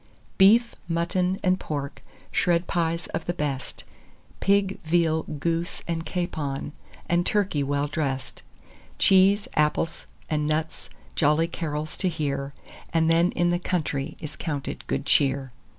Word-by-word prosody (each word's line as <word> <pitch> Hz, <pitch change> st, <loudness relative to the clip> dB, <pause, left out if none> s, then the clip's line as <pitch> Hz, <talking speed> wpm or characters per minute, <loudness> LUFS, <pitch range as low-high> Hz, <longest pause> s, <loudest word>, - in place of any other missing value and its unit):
"Beef, 230 Hz, +5 st, +6 dB
mutton, 180 Hz, +2 st, 0 dB
and 185 Hz, -1 st, +3 dB
pork, 140 Hz, -2 st, -4 dB, 0.3 s
shred 175 Hz, 0 st, +2 dB
pies 170 Hz, -1 st, 0 dB
of 165 Hz, -, -3 dB
the 175 Hz, -, -1 dB
best, 140 Hz, -4 st, -3 dB, 0.6 s
Pig, 195 Hz, -1 st, +2 dB
veal, 160 Hz, -1 st, +2 dB
goose, 165 Hz, +3 st, -3 dB
and 165 Hz, -1 st, -2 dB
capon, 155 Hz, -6 st, -3 dB, 0.4 s
and 175 Hz, 0 st, +2 dB
turkey 195 Hz, -7 st, +1 dB
well 140 Hz, +1 st, 0 dB
dress'd, 140 Hz, -3 st, -3 dB, 0.6 s
Cheese, 195 Hz, +2 st, +5 dB
apples, 150 Hz, +2 st, 0 dB, 0.2 s
and 150 Hz, -1 st, 0 dB
nuts, 155 Hz, +1 st, -2 dB, 0.2 s
jolly 150 Hz, +2 st, +3 dB
carols 155 Hz, -2 st, -4 dB
to 185 Hz, -, +1 dB
hear, 140 Hz, -4 st, -2 dB, 0.4 s
As 165 Hz, -1 st, +3 dB
then 165 Hz, +2 st, +4 dB
in 175 Hz, 0 st, +2 dB
the 175 Hz, -, +1 dB
country 155 Hz, -5 st, -2 dB
is 155 Hz, -1 st, -7 dB
counted 145 Hz, -4 st, -4 dB
good -, -, -1 dB
cheer." 135 Hz, -2 st, +2 dB
165 Hz, 135 wpm, -26 LUFS, 150-175 Hz, 0.6 s, Beef